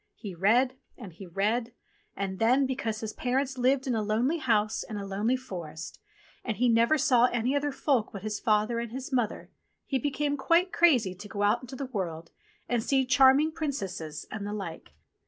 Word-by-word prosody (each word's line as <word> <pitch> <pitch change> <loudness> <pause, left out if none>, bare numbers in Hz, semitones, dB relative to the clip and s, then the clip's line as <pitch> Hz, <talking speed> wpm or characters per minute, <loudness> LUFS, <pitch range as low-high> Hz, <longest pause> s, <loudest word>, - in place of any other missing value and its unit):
He 200 -3 -8
read, 240 +9 +2 0.2
and 205 -9 -10
he 185 +3 -11
read, 220 +7 -1 0.4
and 190 -1 -4
then, 255 +5 +4
because 235 -5 -3
his 220 -1 -4
parents 260 +1 -1
lived 260 +2 +2
in 255 - 0
a 220 - 0
lonely 230 +10 0
house 215 -5 +1
in 215 - -6
a 200 - -5
lonely 205 +6 0
forest 170 -10 -8 0.4
and 220 -4 -3
he 250 +1 +3
never 230 +6 +4
saw 255 -5 +4
any 245 +2 0
other 285 0 0
folk 265 -4 0
but 200 -2 -8
his 215 -1 -3
father 215 +2 +1
and 235 -1 -5
his 265 +2 -6
mother, 240 -4 -1 0.3
he 270 - -1
became 290 +1 -1
quite 340 +6 +2
crazy 255 - +4
to 205 +3 -10
go 205 +1 -2
out 205 - +3
into 255 +1 -9
the 275 - -4
world 170 -9 -5 0.4
and 240 -2 0
see 265 +3 +1
charming 265 +4 +5
princesses 195 - -4
and 205 - -5
the 205 - -4
like. 190 -6 -7
235 Hz, 190 wpm, -28 LUFS, 205-265 Hz, 0.4 s, charming